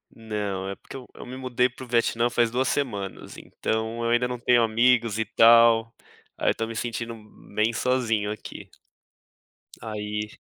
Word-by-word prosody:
Não. 105 -4 -4
É 100 - -4
porque 135 - -11
eu 125 - -12
me 125 +1 -8
mudei 125 -1 +1
para 130 +1 -11
o - - -17
Vietnã 115 0 +1
faz 120 -1 +2
2 130 +2 0
semanas. 105 -10 -3
Então, 110 +1 -3
eu 115 - 0
ainda 120 +1 +2
não 125 -1 -5
tenho 120 0 +4
amigos 115 -1 +2
e 110 - 0
tal, 115 +1 +5 0.4
aí - - +1
eu - - -3
tô 115 - -2
me 115 - -7
sentindo 115 0 -4 0.4
bem 110 +3 +2
sozinho 115 -4 0
aqui. 105 - -9 1.1
Aí 105 -1 -4
115 Hz, 165 wpm, -25 LUFS, 110-120 Hz, 1.1 s, tal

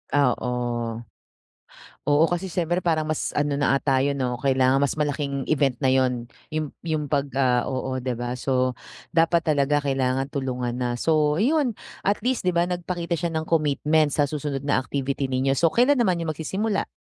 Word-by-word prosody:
Oo. 125 -3 +2 1.6
Oo 145 +2 +4
kasi 175 +2 -1
siyempre 175 -1 -1
parang 165 -3 +1
mas 155 - -2
ano 145 -1 0
na 135 -1 +3
ata 135 -1 +2
'yun 140 +1 +1
'no 125 -3 -2
kailangan 130 0 +3
mas 140 0 +1
malaking 145 -2 -1
event 140 -4 +2
na 130 - +4
'yun. 125 -2 +1 0.2
'Yung 155 -2 -2 0.2
'yung 155 -2 -1
'pag, 145 -1 +1
ah 125 -3 +2
oo, 130 0 -2
di 125 -1 -2
ba? 120 +1 -4
So 130 -1 0 0.3
dapat 165 -1 +2
talaga 145 0 +2
kailangan 135 0 0
tulungan 125 -3 -3
na, 120 -1 -1
so 150 +3 +2
'yun 275 -3 +2 0.3
at 205 +1 +1
least 245 -5 -1
di 180 - +2
ba, 175 +1 +1
nagpakita 175 -1 -2
siya 165 0 -2
ng 160 +1 -2
commitment 150 -1 +2
sa 145 -2 +1
susunod 145 -2 -3
na 145 - +1
activity 135 +1 -2
ninyo. 130 +1 0
So 165 -1 +2
kailan 255 +3 +4
naman 185 -7 +2
'yung 165 - -2
magsisimula, 195 +7 -2
145 Hz, 175 wpm, -24 LUFS, 130-165 Hz, 1.6 s, Oo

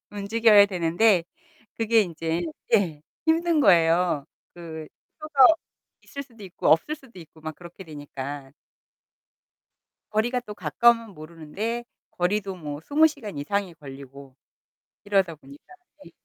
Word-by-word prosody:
움직여야 205 0 +4
되는데 180 +1 +2 0.5
그게 225 0 +3
인제 165 -2 -3 0.3
예, 160 -7 +1 0.2
힘든 330 0 +2
거예요. 170 - +3 0.3
그 160 -2 -8 0.3
표가 290 -4 +5 0.6
있을 280 - -7
수도 230 -6 -15
있고 180 -3 -3
없을 165 - +3
수도 265 -9 -16
있고 160 -1 -15
막 155 0 -6
그렇게 175 +2 -12
되니까. 145 -3 -8 1.6
거리가 240 +4 0
또 215 -4 -10
가까우면 225 +5 +2
모르는데 170 +9 -5 0.3
거리도 195 +2 -1
뭐 150 -4 -7
20 300 - +4
시간 240 - -6
이상이 190 +4 -2
걸리고 135 -2 -12 0.7
이러다 195 -5 +1
보니까. 140 -1 -16 0.4
네. - - -15
180 Hz, 260 characters per minute, -25 LUFS, 155-225 Hz, 1.6 s, 표가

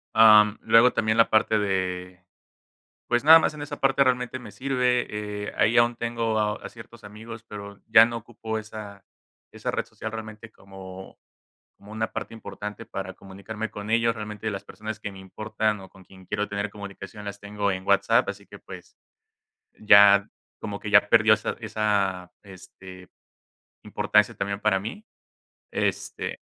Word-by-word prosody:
am, 105 -1 +7
luego 120 +2 +5
también 110 0 0
la 115 - +5
parte 110 0 +3
de 90 -2 -3 0.8
pues, 120 +2 0
nada 160 +2 +10
más 155 - 0
en 150 - -8
esa 145 - -7
parte, 135 0 +3
realmente 125 0 0
me 115 -5 -11
sirve, 120 -4 -1
eh. - - -6
Ahí 110 +3 +3
aún 120 0 +4
tengo 115 -1 -2
a 105 -1 +1
a - - -5
ciertos 115 0 -14
amigos, 110 +2 -10
pero 100 -2 -10
ya 110 0 +8
no 120 0 -3
ocupo 110 -1 -6
esa 105 -2 -10 0.5
esa - - -4
red - - -2
social, 110 - -8
realmente 110 0 -8
como 95 -1 -12 0.6
como 100 - -16
una 110 0 -3
parte - - -6
importante 105 0 -8
para 95 -1 -6
comunicarme 100 +4 -7
con 105 +1 -7
ellos. 115 0 +2
Realmente 105 0 -6
las 100 -2 -5
personas 110 0 -8
que 105 - -5
me 95 - -12
importan, 105 +2 -3
o 95 - -12
con 95 0 -18
quien 95 +1 -17
quiero 105 +2 -3
tener 100 0 -3
comunicación, 100 0 -10
las 100 0 -7
tengo 100 0 -2
en 95 0 -5
WhatsApp, 100 0 +3
así - - -11
que, - - -13
pues, - - -12 0.8
ya 100 -1 +6 0.3
como - - -5
que, - - -6
ya - - +5
perdió - - +5
esa - - -4
esa, 100 -4 -1
este, 95 -1 -13 0.7
importancia - - +1
también 100 0 -3
para 105 -3 +2
mí. 115 - -7 0.7
Este, - - -3
105 Hz, 165 wpm, -25 LUFS, 100-115 Hz, 0.8 s, nada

